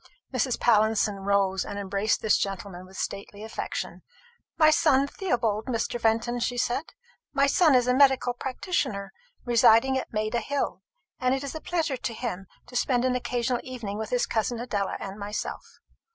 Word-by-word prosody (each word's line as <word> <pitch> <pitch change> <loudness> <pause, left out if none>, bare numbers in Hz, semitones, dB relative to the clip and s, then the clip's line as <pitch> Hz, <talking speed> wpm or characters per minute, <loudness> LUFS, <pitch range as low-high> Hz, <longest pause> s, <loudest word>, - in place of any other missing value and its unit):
Mrs. 255 0 0
Pallinson 215 -2 +3
rose 195 -1 +1
and 200 - -6
embraced 200 +1 0
this 220 - +4
gentleman 195 -2 -4
with 190 0 -13
stately 200 +1 -5
affection. 220 - -5 0.6
"My 310 -1 +6
son 275 -3 +4
Theobald 240 - -1
Mr. 240 -1 -2
Fenton," 230 +2 +1
she 245 +1 -1
said. 245 +5 0 0.5
"My 275 - +4
son 310 0 +4
is 250 -1 +4
a 250 - +3
medical 265 -2 +4
practitioner, 245 - -2 0.3
residing 240 +2 +5
at - - -7
Maida 215 +2 0
hill; 280 +4 -2 0.4
and 255 0 +2
it 270 - -4
is 280 - -5
a 315 - -6
pleasure 320 -6 -1
to 235 - -4
him 195 -6 -4 0.2
to 245 - -13
spend 245 0 +2
an 255 - +2
occasional 245 0 -1
evening 230 -6 -6
with 220 - -4
his 245 -1 +1
cousin 225 +1 -1
Adela 205 -5 -2
and 195 +1 -7
myself." 205 +1 -5
240 Hz, 165 wpm, -27 LUFS, 210-260 Hz, 0.6 s, My